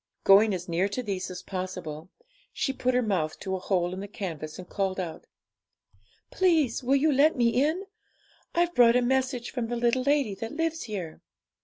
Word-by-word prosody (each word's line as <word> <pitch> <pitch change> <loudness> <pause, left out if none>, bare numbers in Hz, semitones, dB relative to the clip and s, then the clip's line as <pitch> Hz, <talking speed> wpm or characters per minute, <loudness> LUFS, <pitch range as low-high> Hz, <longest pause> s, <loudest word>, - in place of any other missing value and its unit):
Going 205 +2 +6
as 180 0 -6
near 175 +3 0
to 250 +5 -3
these 195 -4 -3
as 180 -1 -7
possible, 180 -4 -6 0.4
she 270 - -1
put 255 -1 0
her 250 - +3
mouth 180 -8 -1
to 190 -1 -2
a - - -4
hole 180 -2 0
in 185 - -5
the 200 - -6
canvas, 160 -7 -6
and 185 -1 -9
called 195 -1 -2
out 170 -3 -6 1.0
'Please 320 -11 +2
will 265 +3 +3
you 300 +3 +3
let 290 +3 +4
me 235 -2 +3
in? 305 +11 +1 0.7
I've 345 0 +2
brought 240 -3 +6
a 250 - +3
message 255 -1 0
from 245 -3 -3
the 240 - -3
little 240 +2 +1
lady 280 -5 +1
that 225 +6 -6
lives 325 +1 -2
here.' 190 -8 -6
225 Hz, 190 wpm, -27 LUFS, 185-265 Hz, 1.0 s, Going